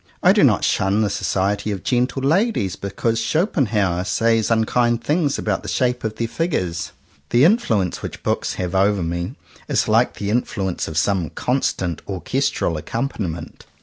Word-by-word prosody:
I - - +7
do - - +4
not - - +4
shun 100 +3 +2
the 105 - 0
society 100 +2 -1
of 100 -3 -4
gentle 125 +2 0
ladies 155 - +1
because 110 +4 -2
Schopenhauer 110 - +1
says 115 +2 +1
unkind 115 +1 +2
things 150 -2 +1
about - - -1
the - - -7
shape 125 -1 0
of 110 -1 -3
their 115 +1 -2
figures. 110 - -2 0.4
The 120 +2 +4
influence 115 - +2
which - - -7
books - - -1
have 90 -1 -3
over 100 0 +2
me, 85 +1 -3 0.3
is - - +1
like - - +3
the 100 0 -3
influence 100 -6 -1
of 80 - -5
some 90 0 +1
constant 95 - -1
orches 120 - -1
tral 80 -2 -1
accompaniment. 90 - -4
105 Hz, 160 wpm, -21 LUFS, 95-125 Hz, 0.4 s, I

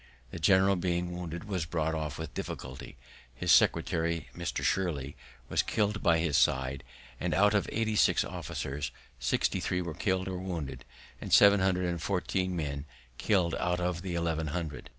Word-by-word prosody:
The - - -6
general, 95 +4 +4
being 90 -1 -1
wounded, 85 -1 -5
was 95 -6 -3
brought 80 -1 -1
off 80 -1 -3
with - - -6
difficulty; 65 +1 -7 0.4
his - - 0
secretary, 85 -1 +3
Mr. - - -3
Shirley, 75 -8 -1 0.3
was - - +2
killed 105 -1 0
by 85 -1 +4
his 80 -3 +1
side; 65 0 +1 0.4
and - - -1
out 105 +2 +4
of 105 - +1
eighty 110 -1 0
six - - +4
officers, 70 +1 -4 0.3
sixty - - +1
three 90 - -1
were 85 -2 -5
killed 95 +2 -1
or 95 -1 -3
wounded, 80 -8 -5 0.4
and - - -6
seven 100 0 +7
hundred 95 -1 +1
and 85 -2 -2
fourteen 90 0 -1
men 70 -3 -3 0.3
killed 90 -5 +2
out 90 0 0
of 90 -1 -2
eleven 85 -3 -1
hundred. 80 -1 -4
85 Hz, 165 wpm, -30 LUFS, 80-95 Hz, 0.4 s, seven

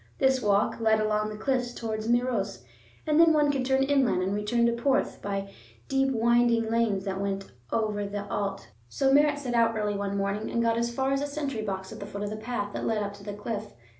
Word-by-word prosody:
This 265 -1 +3
walk 205 0 +2
led 220 -1 +3
along 215 0 0
the 210 - -7
cliffs 245 0 -1
towards 220 -1 -4
Meiros, 235 - 0 0.4
and 305 0 +3
then 330 -1 +7
one 295 -1 +3
could 270 -2 -1
turn 265 +1 +2
inland 270 -9 +2
and 190 +2 -1
return 210 +3 +1
to 235 - +3
Porth 235 +4 0
by 195 -1 -3 0.4
deep 270 0 +2
winding 235 -1 +3
lanes 225 -4 +1
that 195 0 -2
went 195 -1 -3 0.2
over 210 -2 0
the 205 0 -4
Allt. 200 -1 -3 0.2
So 270 - +2
Merritt 290 0 +4
set 260 -4 -4
out 230 -1 +3
early 210 -1 -1
one 200 0 -2
morning 200 +2 -2
and 235 - -1
got 230 0 +2
as 235 0 0
far 265 +2 0
as 275 0 +1
a 290 - -1
sentry 280 -5 -3
box 190 -2 -4
at - - -8
the 200 - -7
foot 205 0 -5
of 205 - -3
the - - -3
path 215 -2 -4
that - - -3
led 225 - +1
up 200 0 -4
to 200 0 -13
the 205 0 -5
cliff. 210 +1 -5
225 Hz, 230 wpm, -27 LUFS, 205-255 Hz, 0.4 s, then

